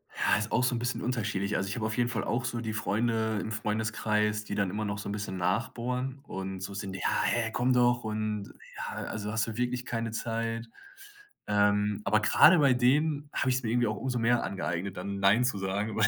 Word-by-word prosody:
Ja, -, -, +3 dB
ist 110 Hz, 0 st, -3 dB
auch 125 Hz, -, +2 dB
so 125 Hz, -, +2 dB
'n -, -, -1 dB
bisschen 120 Hz, +1 st, -2 dB
unterschiedlich. 105 Hz, -5 st, -1 dB
Also, 95 Hz, +1 st, -2 dB
ich -, -, -3 dB
habe 110 Hz, -, -2 dB
auf 110 Hz, +2 st, -2 dB
jeden 120 Hz, -1 st, +2 dB
Fall 115 Hz, -1 st, -2 dB
auch 120 Hz, +3 st, -1 dB
so 120 Hz, -1 st, -2 dB
die 110 Hz, -2 st, -3 dB
Freunde 110 Hz, 0 st, 0 dB
im 110 Hz, -, -4 dB
Freundeskreis, 105 Hz, -1 st, 0 dB
die -, -, -4 dB
dann 100 Hz, -2 st, +1 dB
immer 105 Hz, +3 st, -3 dB
noch 100 Hz, -1 st, -2 dB
so 100 Hz, -, -5 dB
'n -, -, -2 dB
bisschen 105 Hz, -2 st, -4 dB
nachbohren 125 Hz, +8 st, -1 dB
und 95 Hz, -5 st, -5 dB
so 95 Hz, +1 st, -5 dB
sind: 95 Hz, -1 st, -5 dB
„Ja, 95 Hz, -, 0 dB
hä, 115 Hz, -1 st, +1 dB
komm 125 Hz, +3 st, +2 dB
doch 120 Hz, -1 st, +3 dB
und, 110 Hz, -1 st, -3 dB, 0.2 s
ja, -, -, -5 dB
also, 105 Hz, -1 st, -4 dB
hast 110 Hz, 0 st, 0 dB
du 115 Hz, -1 st, -5 dB
wirklich 125 Hz, 0 st, -1 dB
keine 115 Hz, -4 st, -2 dB
Zeit?“ 115 Hz, 0 st, -3 dB, 0.8 s
Ähm, 105 Hz, 0 st, +2 dB
aber 105 Hz, +2 st, +3 dB
gerade 160 Hz, +10 st, +7 dB
bei 140 Hz, -3 st, +5 dB
denen 145 Hz, +4 st, +2 dB
hab -, -, 0 dB
ich's 130 Hz, 0 st, +1 dB
mir 110 Hz, -, -1 dB
irgendwie 120 Hz, -1 st, +2 dB
auch 105 Hz, -, -2 dB
umso 125 Hz, +2 st, -2 dB
mehr 120 Hz, +1 st, +3 dB
angeeignet, 95 Hz, 0 st, -3 dB
dann 100 Hz, 0 st, -4 dB
„Nein“ 100 Hz, +5 st, +4 dB
zu 125 Hz, -5 st, 0 dB
sagen, 100 Hz, +3 st, -2 dB
weil 110 Hz, 0 st, +5 dB
110 Hz, 225 wpm, -29 LUFS, 105-120 Hz, 0.8 s, gerade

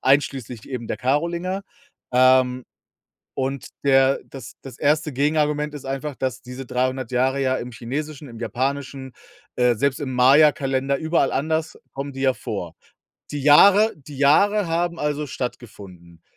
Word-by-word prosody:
einschließlich 130 Hz, -4 st, 0 dB
eben 125 Hz, -4 st, -5 dB
der -, -, -3 dB
Karolinger, 170 Hz, +8 st, -1 dB, 0.5 s
ähm, 130 Hz, 0 st, +4 dB, 0.7 s
und 135 Hz, 0 st, -3 dB, 0.2 s
der 135 Hz, -1 st, +4 dB
das 130 Hz, -3 st, -10 dB
das 130 Hz, -3 st, -11 dB
erste 150 Hz, +1 st, +1 dB
Gegenargument 150 Hz, +1 st, 0 dB
ist 145 Hz, -, -8 dB
einfach, 135 Hz, +2 st, -4 dB
dass 130 Hz, -1 st, -3 dB
diese 125 Hz, +2 st, -8 dB
300 130 Hz, 0 st, -2 dB
Jahre 130 Hz, +2 st, +1 dB
ja 130 Hz, -1 st, +1 dB
im 125 Hz, 0 st, -6 dB
chinesischen, 145 Hz, +6 st, -6 dB
im 115 Hz, -1 st, -11 dB
japanischen, 135 Hz, +1 st, -3 dB, 0.5 s
äh, 125 Hz, -1 st, +3 dB
selbst 135 Hz, +4 st, 0 dB
im 130 Hz, -2 st, -4 dB
Mayakalender 135 Hz, +1 st, +4 dB
überall 160 Hz, -2 st, +1 dB
anders 160 Hz, +3 st, -1 dB, 0.2 s
kommen 140 Hz, +1 st, -5 dB
die 135 Hz, -, -6 dB
ja 135 Hz, -1 st, +3 dB
vor. 100 Hz, -10 st, -6 dB, 0.6 s
Die 145 Hz, -2 st, -4 dB
Jahre 200 Hz, +9 st, +6 dB
die 145 Hz, -1 st, -12 dB
Jahre 200 Hz, +9 st, +4 dB
haben 170 Hz, +1 st, -1 dB
also 150 Hz, 0 st, -2 dB
stattgefunden, 100 Hz, -10 st, -8 dB
135 Hz, 145 wpm, -22 LUFS, 125-150 Hz, 0.7 s, Jahre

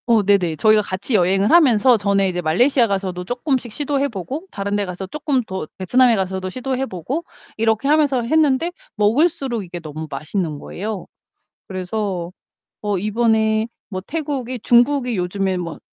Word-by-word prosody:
어 230 Hz, -3 st, +4 dB
네네. 190 Hz, -5 st, +2 dB
저희가 215 Hz, +5 st, +4 dB
같이 200 Hz, +4 st, -3 dB
여행을 195 Hz, +4 st, +3 dB
하면서 255 Hz, -7 st, +6 dB
전에 200 Hz, -2 st, +2 dB
이제 180 Hz, -1 st, -2 dB
말레이시아 235 Hz, -, +3 dB
가서도 190 Hz, -3 st, -2 dB
쪼끔씩 245 Hz, -, -2 dB
시도해 280 Hz, +2 st, 0 dB
보고 265 Hz, -, -6 dB
다른 200 Hz, 0 st, -3 dB
데 205 Hz, -1 st, 0 dB
가서 185 Hz, +1 st, -6 dB
쪼끔 285 Hz, +2 st, -1 dB
더 190 Hz, -6 st, -5 dB
베트남에 240 Hz, +6 st, +4 dB
가서도 190 Hz, -1 st, -2 dB
시도해 260 Hz, +4 st, -2 dB
보고 245 Hz, -, -4 dB, 0.3 s
이렇게 225 Hz, +3 st, +1 dB
하면서 290 Hz, -4 st, +3 dB
했는데 310 Hz, +4 st, +2 dB, 0.2 s
먹을수록 245 Hz, -, +1 dB
이게 175 Hz, -1 st, -7 dB
너무 155 Hz, -1 st, -7 dB
맛있는 155 Hz, +3 st, -3 dB
거예요. 205 Hz, +6 st, -5 dB, 0.6 s
그래서 185 Hz, -2 st, -3 dB, 0.5 s
어 205 Hz, -1 st, -1 dB
이번에 220 Hz, +1 st, +1 dB, 0.2 s
뭐 185 Hz, -2 st, -4 dB
태국이 265 Hz, -, -3 dB
중국이 245 Hz, +1 st, +3 dB
요즘에 190 Hz, +1 st, -1 dB
뭐 170 Hz, -3 st, -5 dB
215 Hz, 360 characters per minute, -20 LUFS, 185-255 Hz, 0.6 s, 하면서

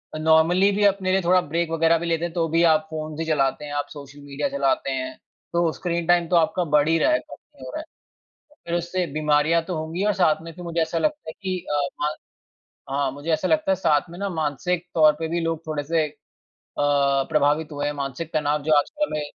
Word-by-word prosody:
अ, -, -, -3 dB
normally 160 Hz, +5 st, +4 dB
भी 205 Hz, +1 st, 0 dB
अपने 190 Hz, -2 st, +2 dB
लिए 190 Hz, 0 st, +2 dB
थोड़ा 180 Hz, +1 st, +4 dB
ब्रेक 165 Hz, +1 st, -2 dB
वगैरह 165 Hz, 0 st, +3 dB
भी 170 Hz, -, -4 dB
लेते 165 Hz, 0 st, 0 dB
हैं 170 Hz, -, -5 dB
तो 165 Hz, -1 st, 0 dB
भी 165 Hz, +2 st, +3 dB
आप 155 Hz, -1 st, +3 dB
फ़ोन्स 155 Hz, 0 st, -5 dB
ही 165 Hz, -, -1 dB
चलाते 150 Hz, -1 st, 0 dB
हैं, 145 Hz, -, -7 dB
आप 145 Hz, 0 st, -2 dB
सोशल 145 Hz, 0 st, -11 dB
मीडिया 140 Hz, 0 st, -3 dB
चलाते 135 Hz, -1 st, 0 dB
हैं 130 Hz, 0 st, -3 dB, 0.4 s
तो 170 Hz, -1 st, +2 dB
स्क्रीन 170 Hz, -2 st, -3 dB
टाइम 175 Hz, -1 st, +3 dB
तो 180 Hz, -, +1 dB
आपका 170 Hz, +2 st, +2 dB
बढ़ 150 Hz, 0 st, +4 dB
ही 165 Hz, -, +3 dB
रहा 315 Hz, -, +3 dB
है, 310 Hz, -, +3 dB
कम -, -, -12 dB, 0.2 s
नहीं -, -, -11 dB
हो -, -, -7 dB
रहा -, -, -3 dB
है। -, -, -13 dB, 0.8 s
फिर 170 Hz, -, -1 dB
उससे 175 Hz, +1 st, -2 dB
बीमारियाँ 150 Hz, +2 st, +2 dB
तो 180 Hz, -1 st, -3 dB
होंगी 160 Hz, +5 st, -3 dB
और 210 Hz, -, +3 dB
साथ 160 Hz, -5 st, +2 dB
में 165 Hz, -, -8 dB
फि 180 Hz, -, -11 dB
मुझे 170 Hz, -1 st, -2 dB
ऐसा 160 Hz, +1 st, -1 dB
लगता 300 Hz, -, -1 dB
है -, -, -7 dB
कि 185 Hz, -1 st, -2 dB
अ, 145 Hz, -1 st, +1 dB
म 150 Hz, -, +2 dB, 0.9 s
हाँ। 140 Hz, -1 st, 0 dB
मुझे 145 Hz, +4 st, -7 dB
ऐसा 185 Hz, +4 st, 0 dB
लगता 310 Hz, -9 st, +2 dB
है 190 Hz, -, +3 dB
साथ 155 Hz, -3 st, +1 dB
में 175 Hz, -, -10 dB
ना 200 Hz, -, -2 dB
मानसिक 165 Hz, +2 st, -2 dB
तौर 155 Hz, -2 st, +6 dB
पे 160 Hz, -, -2 dB
भी 170 Hz, +2 st, -1 dB
लोग 165 Hz, -1 st, -1 dB
थोड़े 150 Hz, -2 st, -2 dB
से 160 Hz, +2 st, +1 dB
अ, -, -, -13 dB, 0.7 s
प्रभावित 145 Hz, +2 st, +2 dB
हुए 145 Hz, 0 st, -3 dB
हैं, 145 Hz, -, -1 dB
मानसिक 140 Hz, +3 st, -5 dB
तनाव 150 Hz, -1 st, 0 dB
जो 155 Hz, 0 st, +2 dB
आजकल 300 Hz, -, -1 dB
में 150 Hz, -, -2 dB
160 Hz, 240 wpm, -23 LUFS, 145-175 Hz, 0.9 s, तौर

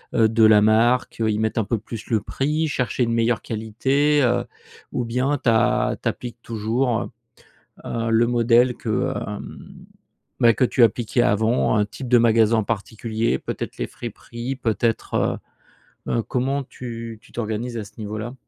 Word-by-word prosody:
heu, 110 Hz, -, +5 dB
de 115 Hz, 0 st, +3 dB
la 105 Hz, -1 st, +7 dB
marque? 115 Hz, +3 st, +2 dB
Heu, 110 Hz, -, +2 dB
y 105 Hz, -, -1 dB
mettre 110 Hz, +1 st, 0 dB
un -, -, +2 dB
peu 115 Hz, -, 0 dB
plus 110 Hz, +1 st, -8 dB
le 110 Hz, -2 st, +2 dB
prix, 150 Hz, +4 st, -1 dB
chercher 125 Hz, -2 st, -1 dB
une 115 Hz, -, 0 dB
meilleure 115 Hz, 0 st, +1 dB
qualité, 135 Hz, +7 st, +1 dB
heu? 120 Hz, -, +1 dB, 0.5 s
Ou 120 Hz, -, -1 dB
bien 130 Hz, +5 st, 0 dB
tu 120 Hz, -, 0 dB
a 115 Hz, +1 st, +2 dB
tu -, -, +1 dB
appliques 120 Hz, -1 st, -7 dB
toujours, 115 Hz, +2 st, -1 dB
heu -, -, -6 dB, 0.8 s
heu, 115 Hz, 0 st, -2 dB
le 115 Hz, +1 st, +4 dB
modèle 120 Hz, +1 st, +3 dB
que, 110 Hz, -2 st, -1 dB
hem, -, -, -8 dB, 0.5 s
bah, 115 Hz, -2 st, +6 dB
que 125 Hz, -, +2 dB
tu 125 Hz, 0 st, +2 dB
appliquais 115 Hz, +2 st, +1 dB
avant, 110 Hz, 0 st, +2 dB
un 105 Hz, -, +3 dB
type 125 Hz, +4 st, -8 dB
de 125 Hz, -, +5 dB
magasin 115 Hz, -1 st, +4 dB
en 110 Hz, -, 0 dB
particulier, 110 Hz, -, -2 dB
peut-être -, -, -6 dB
les -, -, -2 dB
friperies? 120 Hz, +2 st, -6 dB
Peut-être, 115 Hz, -2 st, 0 dB, 0.7 s
heu -, -, -1 dB
heu, 115 Hz, -, +1 dB
comment 135 Hz, +4 st, -1 dB
tu 115 Hz, -3 st, -8 dB
tu -, -, -20 dB
t'organises 115 Hz, +1 st, -3 dB
à 105 Hz, -, -4 dB
ce 100 Hz, -, -15 dB
niveau-là? 110 Hz, +3 st, -5 dB
115 Hz, 175 wpm, -22 LUFS, 110-125 Hz, 0.8 s, la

